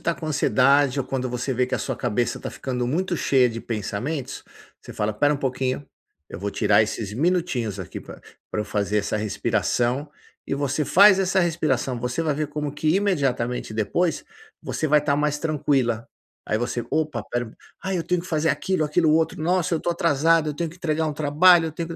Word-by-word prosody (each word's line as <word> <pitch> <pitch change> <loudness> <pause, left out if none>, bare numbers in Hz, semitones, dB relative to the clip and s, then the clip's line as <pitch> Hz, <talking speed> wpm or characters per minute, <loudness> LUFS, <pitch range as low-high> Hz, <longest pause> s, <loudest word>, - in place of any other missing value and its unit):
tá 170 - 0
com 160 - -7
ansiedade 140 -2 +3
ou 130 - -1
quando 130 -1 -2
você 125 +2 -2
vê 125 +1 +2
que 130 - -2
a - - -5
sua - - -3
cabeça 120 0 -1
tá - - -5
ficando 125 -2 -3
muito 175 +5 -1
cheia 130 -4 +3
de 115 0 -6
pensamentos, 120 +6 -4 0.4
você - - -11
fala: 105 0 -1
"Espera 145 +7 +2
um - - 0
pouquinho. 130 +1 -2 0.4
Eu 85 - -8
vou 100 - -2
tirar 110 - +3
esses 105 -1 -4
minutinhos 130 - 0
aqui 95 - -7
pra - - -12 0.3
pra 105 - -2
eu - - -2
fazer 105 0 -1
essa 105 +1 -1
respiração". 120 +6 -1 0.3
E - - -2
você 145 +1 -1
faz 195 +3 +6
essa 190 0 +1
respiração. 155 -8 0
Você 125 +6 -2
vai 155 -3 0
ver 150 0 -2
como 150 -1 -4
que 155 - -1
imediatamente 135 - 0
depois, 150 - 0 0.4
você 155 - -2
vai 150 +1 +5
estar 145 -1 +1
mais 150 0 0
tranquila. 140 -7 0 0.4
Aí 110 - -1
você: 120 0 -2
"Opa, 155 -7 -1
espera. 120 +1 -5 0.2
Ah, 190 0 -3
eu 170 - 0
tenho 180 0 0
que 175 - -10
fazer 160 -1 0
aquilo, 155 +4 0
aquilo 155 +1 +2
outro. 160 0 +1
Nossa, 175 0 +1
tô - - -4
atrasado. 165 -2 +2
Eu 145 - -6
tenho 170 -1 -2
que 170 - -13
entregar 160 -3 -1
um 150 - -1
trabalho, 160 +3 +5
eu 160 - -5
tenho 165 +1 -5
145 Hz, 200 wpm, -23 LUFS, 125-160 Hz, 0.4 s, faz